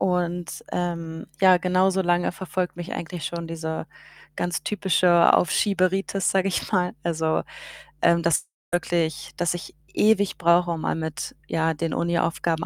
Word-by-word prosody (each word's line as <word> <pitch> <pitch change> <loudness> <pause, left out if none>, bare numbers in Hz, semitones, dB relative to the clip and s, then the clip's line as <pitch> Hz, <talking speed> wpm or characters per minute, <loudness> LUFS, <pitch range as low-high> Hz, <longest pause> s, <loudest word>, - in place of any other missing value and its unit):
und, 175 -1 -1
ähm, 165 -2 -3 0.2
ja, 185 -1 +7
genauso 185 +1 +2
lange 175 0 +1
verfolgt 185 0 -3
mich 175 +2 -6
eigentlich 170 0 -5
schon 170 -1 -4
diese 160 -1 -4 0.5
ganz 175 0 -2
typische 180 -3 +4
Aufschieberitis, 190 +1 +2
sage 195 0 +2
ich 185 - -2
mal. 180 -2 +1
Also, 160 -1 0 0.6
ähm, 170 0 +4
dass 165 -1 +2 0.3
wirklich 170 -3 -1
dass 175 0 +1
ich 175 - -8 0.2
ewig 205 -2 +3
brauche, 170 +1 +3
um 165 -2 -3
mal - - -1
mit, 160 -4 -5
ja, 160 0 +1
den 165 +1 -3
Uniaufgaben 170 -1 0
175 Hz, 140 wpm, -24 LUFS, 165-180 Hz, 0.6 s, ja